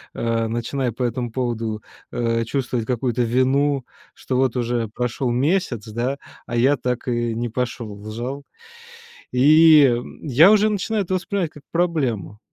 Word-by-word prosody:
э, 115 Hz, -1 st, 0 dB
начинаю 120 Hz, +2 st, -2 dB
по 125 Hz, -, -8 dB
этому 120 Hz, -1 st, -2 dB
поводу, 115 Hz, -3 st, -3 dB, 0.3 s
э, 115 Hz, -1 st, 0 dB
чувствовать 120 Hz, -2 st, -2 dB
какую-то 125 Hz, -1 st, 0 dB
вину, 130 Hz, +3 st, +1 dB, 0.3 s
что 130 Hz, -, -3 dB
вот 130 Hz, -2 st, +1 dB
уже 120 Hz, -1 st, -1 dB
прошел 125 Hz, +1 st, -2 dB
месяц, 130 Hz, -, 0 dB
да, 120 Hz, +5 st, -2 dB, 0.3 s
а 120 Hz, -, -4 dB
я 135 Hz, +4 st, +3 dB
так 125 Hz, 0 st, -3 dB
и 120 Hz, -1 st, -1 dB
не 120 Hz, 0 st, -2 dB
пошел 120 Hz, -3 st, -4 dB
в 105 Hz, +1 st, -9 dB
зал. 130 Hz, +5 st, -5 dB, 0.9 s
И 150 Hz, -1 st, +6 dB, 0.3 s
я 155 Hz, +7 st, +6 dB
уже 215 Hz, 0 st, +4 dB
начинаю 210 Hz, 0 st, -1 dB
это 185 Hz, -, -2 dB
воспринимать 185 Hz, -2 st, -2 dB
как 150 Hz, -, -14 dB
проблему. 135 Hz, -, -1 dB
125 Hz, 150 wpm, -22 LUFS, 115-140 Hz, 0.9 s, И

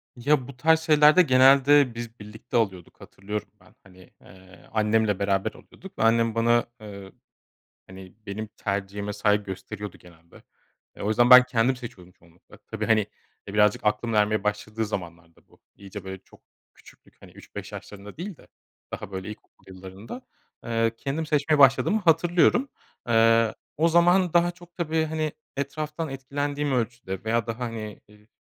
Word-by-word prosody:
Ya, 130 Hz, +1 st, +1 dB
bu 135 Hz, -2 st, -12 dB
tarz 160 Hz, +3 st, +3 dB
şeylerde 155 Hz, +2 st, +5 dB
genelde 135 Hz, -2 st, +5 dB
biz 120 Hz, -1 st, -8 dB
birlikte 110 Hz, +3 st, -5 dB
alıyorduk, 95 Hz, -6 st, -3 dB
hatırlıyorum 105 Hz, +2 st, -6 dB
ben. -, -, -22 dB
Hani, 95 Hz, -1 st, -18 dB
eee, 95 Hz, 0 st, -18 dB
annemle 105 Hz, -2 st, +1 dB
beraber 100 Hz, -1 st, 0 dB
alıyorduk 190 Hz, -, -15 dB
ve -, -, +1 dB
annem 115 Hz, 0 st, +2 dB
bana, 120 Hz, +1 st, +2 dB, 0.2 s
eee, 100 Hz, -2 st, -10 dB, 0.8 s
hani, 95 Hz, 0 st, -12 dB
benim 105 Hz, +2 st, -5 dB
tercihime 100 Hz, +1 st, -3 dB
saygı 105 Hz, 0 st, +1 dB
gösteriyordu 100 Hz, +1 st, -8 dB
genelde. 85 Hz, -1 st, -19 dB, 0.5 s
E, -, -, -11 dB
o 100 Hz, -, -2 dB
yüzden 120 Hz, +3 st, +3 dB
ben 125 Hz, 0 st, +10 dB
kendim 125 Hz, +1 st, +1 dB
seçiyordum 120 Hz, -8 st, -11 dB
çoğunlukla. 85 Hz, 0 st, -21 dB
Tabii, -, -, -6 dB
hani, 110 Hz, -1 st, +4 dB, 0.5 s
e, 100 Hz, -, -8 dB
birazcık 105 Hz, 0 st, +2 dB
aklımın 105 Hz, +2 st, 0 dB
ermeye 105 Hz, 0 st, +1 dB
başladığı 105 Hz, +2 st, -2 dB
zamanlarda 85 Hz, -4 st, -8 dB
bu -, -, -25 dB, 0.2 s
iyice, 100 Hz, 0 st, -10 dB
böyle, 95 Hz, 0 st, -7 dB
çok -, -, -21 dB, 0.3 s
küçüklük, -, -, -21 dB
hani, -, -, -15 dB
3-5 -, -, -10 dB
yaşlarında 105 Hz, +2 st, -10 dB
değil 180 Hz, 0 st, -7 dB
de -, -, -20 dB, 0.4 s
daha, -, -, -7 dB
böyle, 95 Hz, +1 st, -6 dB
ilkokul 105 Hz, -, -13 dB
yıllarında, 95 Hz, -, -10 dB, 0.4 s
eee, 115 Hz, -1 st, 0 dB
kendim 150 Hz, +4 st, -3 dB
seçmeye 150 Hz, 0 st, +1 dB
başladığımı 135 Hz, +10 st, +5 dB
hatırlıyorum. 175 Hz, -, +3 dB, 0.4 s
Eee, 115 Hz, -1 st, +3 dB, 0.2 s
o 165 Hz, +2 st, +3 dB
zaman 175 Hz, +1 st, +3 dB
daha 175 Hz, 0 st, +3 dB
çok, 175 Hz, 0 st, -18 dB
tabii, 160 Hz, -2 st, -1 dB
hani, 155 Hz, -1 st, -2 dB, 0.3 s
etraftan 150 Hz, +2 st, -4 dB
etkilendiğim 145 Hz, +2 st, -3 dB
ölçüde 120 Hz, -6 st, -3 dB
veya 115 Hz, +1 st, -1 dB
daha, 115 Hz, +1 st, -5 dB
hani, 115 Hz, -3 st, -6 dB
ııı, 105 Hz, +1 st, -21 dB
115 Hz, 155 wpm, -25 LUFS, 105-145 Hz, 0.8 s, ben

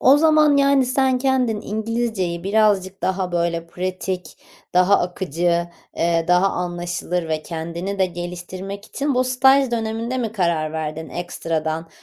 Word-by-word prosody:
O 270 Hz, +3 st, +7 dB
zaman, 305 Hz, -2 st, +5 dB
yani, 275 Hz, -2 st, +4 dB
sen 260 Hz, 0 st, +2 dB
kendin 250 Hz, -5 st, +1 dB
İngilizceyi 220 Hz, -5 st, -2 dB
birazcık 200 Hz, -2 st, +2 dB
daha, 185 Hz, -1 st, -1 dB
böyle, 170 Hz, -1 st, -1 dB
pratik, 185 Hz, -1 st, -4 dB, 0.4 s
daha 185 Hz, +2 st, +5 dB
akıcı, 175 Hz, -1 st, 0 dB, 0.3 s
eee, 165 Hz, 0 st, +1 dB
daha 180 Hz, +2 st, +4 dB
anlaşılır 175 Hz, -1 st, -3 dB
ve 155 Hz, -1 st, -1 dB
kendini 170 Hz, +5 st, -5 dB
de 190 Hz, -, +3 dB
geliştirmek 180 Hz, +3 st, -7 dB
için 280 Hz, -1 st, -2 dB
bu 255 Hz, +1 st, +2 dB
staj 265 Hz, +1 st, +4 dB
döneminde 230 Hz, +2 st, -2 dB
mi 225 Hz, -3 st, -2 dB
karar 170 Hz, -6 st, 0 dB
verdin 160 Hz, 0 st, -4 dB
ekstradan 165 Hz, -2 st, -3 dB
185 Hz, 135 wpm, -21 LUFS, 170-235 Hz, 0.4 s, O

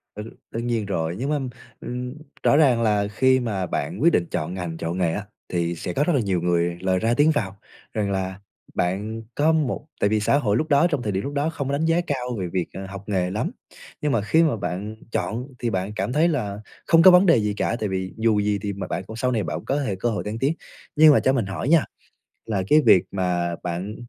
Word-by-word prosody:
Đ -, -, -8 dB, 0.3 s
đương 115 Hz, +1 st, -3 dB
nhiên 115 Hz, -3 st, 0 dB
rồi, 85 Hz, -3 st, -2 dB
nhưng 135 Hz, +4 st, -2 dB
mà, 150 Hz, -1 st, +1 dB, 0.4 s
ừm, 125 Hz, +1 st, -5 dB, 0.3 s
rõ -, -, +4 dB
ràng 130 Hz, -7 st, +4 dB
là 105 Hz, -2 st, +2 dB
khi 130 Hz, +5 st, +3 dB
mà 100 Hz, -6 st, -2 dB
bạn 70 Hz, -, -3 dB
quyết 170 Hz, +1 st, +5 dB
định 85 Hz, -, +2 dB
chọn 80 Hz, +4 st, -2 dB
ngành, 90 Hz, -3 st, -5 dB
chọn 85 Hz, +2 st, -3 dB
nghề 85 Hz, -3 st, +1 dB
á, 100 Hz, -, -4 dB, 0.2 s
thì 85 Hz, -1 st, -1 dB
sẽ 90 Hz, +1 st, -5 dB
có 145 Hz, -, +1 dB
rất 175 Hz, -, +1 dB
là 140 Hz, -, +3 dB
nhiều 95 Hz, -4 st, 0 dB
người 85 Hz, 0 st, +1 dB
lời 95 Hz, -1 st, +1 dB
ra 115 Hz, +3 st, +1 dB
tiếng 150 Hz, +2 st, +5 dB
vào 100 Hz, -9 st, -2 dB, 0.4 s
rằng 105 Hz, -2 st, -1 dB
là 95 Hz, 0 st, -3 dB, 0.4 s
bạn 105 Hz, +5 st, -1 dB
có 155 Hz, +2 st, +3 dB
một 150 Hz, -2 st, 0 dB
tại 100 Hz, -, +2 dB
vì 110 Hz, -, +2 dB
xã 110 Hz, +7 st, +2 dB
hội 110 Hz, -6 st, +1 dB
lúc 155 Hz, -, 0 dB
đó, 145 Hz, +4 st, +5 dB
trong 145 Hz, -6 st, -1 dB
thời 105 Hz, -, -2 dB
điểm 95 Hz, 0 st, -2 dB
lúc 140 Hz, -, -4 dB
đó 145 Hz, +2 st, 0 dB
không 145 Hz, -4 st, -4 dB
có -, -, -2 dB
đánh 155 Hz, +3 st, 0 dB
giá 165 Hz, +2 st, +3 dB
cao 125 Hz, -3 st, -2 dB
về 90 Hz, -, -2 dB
việc, 90 Hz, -2 st, 0 dB
ờ, 95 Hz, 0 st, -6 dB
học 100 Hz, 0 st, -8 dB
nghề 90 Hz, -3 st, 0 dB
lắm, 105 Hz, -, -2 dB, 0.5 s
nhưng 150 Hz, -, 0 dB
mà 115 Hz, -, +2 dB
khi 160 Hz, +11 st, +3 dB
mà 155 Hz, -7 st, +2 dB
bạn 100 Hz, +3 st, -4 dB, 0.2 s
chọn 120 Hz, +4 st, -2 dB
thì 120 Hz, -, -1 dB
bạn 95 Hz, +1 st, -2 dB
cảm 125 Hz, -, -2 dB
thấy 155 Hz, +3 st, +4 dB
là 105 Hz, -11 st, -2 dB, 0.3 s
không 165 Hz, 0 st, +6 dB
có 185 Hz, -, +9 dB
vấn 180 Hz, +2 st, +6 dB
đề 165 Hz, -, +6 dB
gì 105 Hz, -1 st, 0 dB
cả, 115 Hz, -, -1 dB
tại 105 Hz, -, -1 dB
vì 95 Hz, -1 st, -3 dB
dù 110 Hz, -2 st, +2 dB
gì 105 Hz, 0 st, 0 dB
thì 100 Hz, -1 st, -3 dB
mà 100 Hz, -, -5 dB
bạn 95 Hz, -, -3 dB
cũng 110 Hz, -, -9 dB
sau 125 Hz, +2 st, 0 dB
này 110 Hz, -4 st, 0 dB
bạn -, -, -3 dB
cũng -, -, -10 dB
có 145 Hz, +2 st, 0 dB
thể 100 Hz, -, -1 dB
cơ 120 Hz, -, 0 dB
hội 105 Hz, -3 st, -2 dB
thăng 105 Hz, +2 st, -4 dB
tiến. 140 Hz, +5 st, +1 dB, 0.4 s
Nhưng 155 Hz, -1 st, +8 dB
mà -, -, +5 dB
cho 130 Hz, -, +2 dB
mình 120 Hz, -7 st, 0 dB
hỏi 95 Hz, +8 st, -3 dB
nha, 165 Hz, -3 st, +5 dB, 0.6 s
là 100 Hz, -4 st, -1 dB
cái 155 Hz, -, +6 dB
việc 90 Hz, -, +7 dB
mà 90 Hz, -2 st, -1 dB
bạn 90 Hz, +4 st, -4 dB
105 Hz, 260 wpm, -23 LUFS, 95-135 Hz, 0.6 s, có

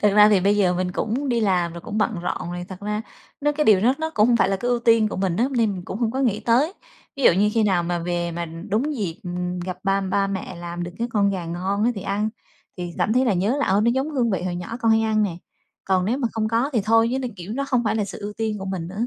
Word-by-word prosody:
Thật 210 Hz, -, +6 dB
ra 210 Hz, 0 st, +8 dB
thì 205 Hz, -3 st, +4 dB
bây 200 Hz, +3 st, +3 dB
giờ 180 Hz, -3 st, +3 dB
mình 180 Hz, 0 st, -1 dB
cũng 250 Hz, +9 st, -2 dB
đi 240 Hz, -2 st, +1 dB
làm 180 Hz, -5 st, +1 dB
rồi, 170 Hz, -, -8 dB
cũng 210 Hz, -, -4 dB
bận 215 Hz, -, +1 dB
rộn 175 Hz, 0 st, -3 dB
rồi. 175 Hz, 0 st, -5 dB
Thật 190 Hz, 0 st, -9 dB
ra 210 Hz, +1 st, -2 dB, 0.4 s
nó 295 Hz, +1 st, +2 dB
cái 300 Hz, +1 st, 0 dB
điều 205 Hz, -6 st, +6 dB
đó 245 Hz, +5 st, +3 dB
nó 320 Hz, 0 st, -2 dB
cũng 210 Hz, -, +4 dB
hông 240 Hz, -, +4 dB
phải 190 Hz, -, +3 dB
là 195 Hz, -, +1 dB
cái 245 Hz, +5 st, -3 dB
ưu 245 Hz, -, +2 dB
tiên 230 Hz, -2 st, +4 dB
của -, -, -5 dB
mình 185 Hz, -2 st, 0 dB
á, 235 Hz, -, +2 dB
nên 270 Hz, -, -2 dB, 0.2 s
mình 180 Hz, -2 st, -7 dB
cũng 195 Hz, -, -5 dB
không 230 Hz, -2 st, +1 dB
có 260 Hz, -, -3 dB
nghĩ 230 Hz, -6 st, +1 dB
tới. 255 Hz, +9 st, +2 dB, 0.4 s
Ví 275 Hz, -, -4 dB
dụ -, -, +7 dB
như 205 Hz, +4 st, +2 dB
khi 225 Hz, -, +3 dB
nào 190 Hz, -4 st, +2 dB
mà 175 Hz, 0 st, -1 dB
về 175 Hz, 0 st, -2 dB
mà 170 Hz, +1 st, -3 dB
đúng 210 Hz, -, -2 dB
dịp 190 Hz, -5 st, -4 dB, 0.4 s
gặp 180 Hz, 0 st, -5 dB
ba 195 Hz, 0 st, +2 dB
ba 195 Hz, +1 st, 0 dB
mẹ 195 Hz, -1 st, -4 dB
làm 175 Hz, 0 st, -6 dB
được 175 Hz, -, -4 dB
cái 235 Hz, -, -1 dB
con 200 Hz, -3 st, +2 dB
gà 185 Hz, -3 st, -3 dB
ngon 185 Hz, +5 st, -1 dB
á, 240 Hz, -, +3 dB
thì 200 Hz, -, -5 dB
ăn, 205 Hz, +2 st, -1 dB, 0.5 s
thì 175 Hz, -2 st, -5 dB
cảm 215 Hz, -, +1 dB
thấy 255 Hz, +2 st, +3 dB
là 235 Hz, -, +2 dB
nhớ 200 Hz, +9 st, +1 dB
là 285 Hz, -, +1 dB
"Ơ, 195 Hz, +2 st, +3 dB
nó 235 Hz, -, +3 dB
giống 265 Hz, +5 st, -1 dB
hương 250 Hz, -6 st, +1 dB
vị 185 Hz, -2 st, -1 dB
hồi 180 Hz, -1 st, -2 dB
nhỏ 180 Hz, +6 st, -5 dB
con 225 Hz, -, +3 dB
hay 220 Hz, -, +4 dB
ăn 215 Hz, -1 st, +2 dB
nè!" 185 Hz, -5 st, -1 dB, 0.5 s
Còn 185 Hz, -1 st, +2 dB
nếu 235 Hz, +8 st, 0 dB
mà 245 Hz, -, 0 dB
không 220 Hz, -1 st, -1 dB
có 235 Hz, +5 st, +1 dB
thì 230 Hz, -, +2 dB
thôi, 225 Hz, +1 st, +4 dB
chứ 265 Hz, -, 0 dB
nó 255 Hz, -, -2 dB
kiểu, 180 Hz, +4 st, -7 dB
nó 275 Hz, +4 st, -2 dB
hông 245 Hz, -2 st, +1 dB
phải 220 Hz, -, +1 dB
là 210 Hz, -, +1 dB
sự 200 Hz, -, -8 dB
ưu 205 Hz, 0 st, -5 dB
tiên 220 Hz, -2 st, -2 dB
của 190 Hz, -, -6 dB
mình 185 Hz, -3 st, -4 dB
nữa. 210 Hz, +6 st, -2 dB
210 Hz, 310 wpm, -23 LUFS, 185-230 Hz, 0.5 s, ra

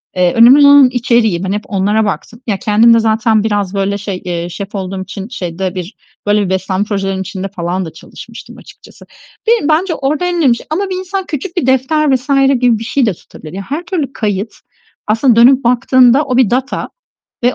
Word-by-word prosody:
eee, 180 Hz, -1 st, +2 dB
önemli 260 Hz, +5 st, +7 dB
olan 285 Hz, -2 st, +7 dB
içeriği, 235 Hz, -7 st, +1 dB
ben 190 Hz, -, -2 dB
hep 210 Hz, +1 st, -2 dB
onlara 205 Hz, +2 st, 0 dB
baktım. 230 Hz, +4 st, -5 dB
Ya, 200 Hz, -3 st, 0 dB
kendim 225 Hz, +2 st, +4 dB
de 230 Hz, -, +4 dB
zaten 220 Hz, -1 st, +1 dB
biraz 205 Hz, -3 st, -1 dB
böyle 200 Hz, 0 st, -1 dB
şey, 195 Hz, -2 st, -6 dB
eee, 175 Hz, -1 st, -4 dB
şef 200 Hz, +3 st, -7 dB
olduğum 190 Hz, 0 st, -4 dB
için 195 Hz, +2 st, -8 dB
şeyde 185 Hz, -4 st, -5 dB
bir, 180 Hz, +4 st, -6 dB, 0.3 s
böyle 205 Hz, 0 st, +2 dB
bir -, -, -4 dB
beslenme 190 Hz, +1 st, -1 dB
projelerinin 195 Hz, -2 st, -2 dB
içinde 190 Hz, +1 st, -5 dB
falan 180 Hz, +2 st, -3 dB
da 160 Hz, -, -9 dB
çalışmıştım -, -, -12 dB
açıkçası. -, -, -16 dB, 0.4 s
Beni 455 Hz, -10 st, +2 dB
bence 330 Hz, +2 st, +1 dB
orada 290 Hz, +5 st, -2 dB
en 355 Hz, -, -1 dB
önemli 270 Hz, -8 st, +3 dB
şey -, -, -11 dB
ama 385 Hz, +6 st, -2 dB
bir 375 Hz, -, -3 dB
insan 375 Hz, +1 st, -4 dB
küçük 335 Hz, +5 st, -6 dB
bir 275 Hz, -, 0 dB
defter 265 Hz, +2 st, +2 dB
vs. 255 Hz, +3 st, -6 dB, 0.3 s
gibi 240 Hz, -3 st, +2 dB
bir -, -, -6 dB
şey 255 Hz, +3 st, 0 dB
de 215 Hz, -, 0 dB
tutabilir. 160 Hz, -1 st, -14 dB
Ya, 195 Hz, -, -5 dB
her 300 Hz, +5 st, -3 dB
türlü 315 Hz, -7 st, -3 dB
kayıt, 210 Hz, -1 st, -3 dB, 0.5 s
aslında 225 Hz, +3 st, +2 dB
dönüp 255 Hz, +3 st, +5 dB
baktığında, 250 Hz, +2 st, +3 dB
o 255 Hz, -2 st, -1 dB
bir 255 Hz, -6 st, +3 dB
data 260 Hz, +3 st, -2 dB, 0.6 s
ve 245 Hz, -, +2 dB
225 Hz, 200 wpm, -14 LUFS, 195-270 Hz, 0.6 s, önemli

